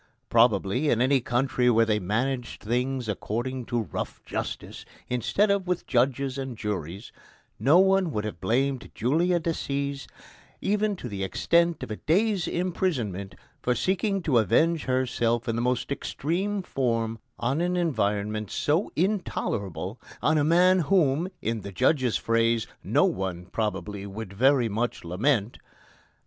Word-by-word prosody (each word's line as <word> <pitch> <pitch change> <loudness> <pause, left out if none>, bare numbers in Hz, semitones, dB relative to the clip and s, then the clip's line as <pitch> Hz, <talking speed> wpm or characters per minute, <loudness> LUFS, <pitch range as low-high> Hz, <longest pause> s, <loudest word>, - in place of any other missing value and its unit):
Probably, 115 +3 +3
in 115 - +2
any 130 +2 +3
country 125 +1 +1
where 115 -1 +4
they 105 -1 +1
managed 120 +6 -2
things 125 +2 -1
according 120 +5 -3
to 120 -1 -1
"rough - - -5
justice" - - -5 0.3
instead 195 - +1
of 200 -2 0
with 180 -1 -1
judges 135 +1 +1
and 130 -3 -5
juries, 100 -2 -4 0.5
no 140 +10 +5
one 190 -1 +4
would 105 -8 -2
have 105 -6 -6
blamed 130 +6 0
Julia 170 +9 +2
Decies 140 -4 -3 0.5
even 210 +1 0
to 150 - -7
the 100 -4 -4
extent 170 - +2
of 130 - -6
a 105 - -3
day's 195 +2 +1
imprisonment 130 - -2 0.3
for 125 - +1
seeking 195 - 0
to 135 -8 +3
avenge 160 - +2
herself 125 -2 0
in 115 - 0
the 115 - -1
most 125 +2 -1
extreme 185 +8 -2
form 115 -6 -1 0.2
on 130 +7 0
an 180 +1 0
environment 105 - 0
so 160 +7 0
intolerable 105 - -2 0.2
on 155 0 +2
a - - +2
man 180 +4 +5
whom, 165 -1 +2
in 115 -1 -1
the 100 - -7
judge's 130 - +2
phrase, 115 0 +1 0.2
"no - - +3
one, 90 -2 -2
probably, 105 0 -3
would 100 0 -7
very 130 +3 +3
much 115 +3 -2
lament." 105 +6 0
125 Hz, 145 wpm, -26 LUFS, 110-160 Hz, 0.5 s, no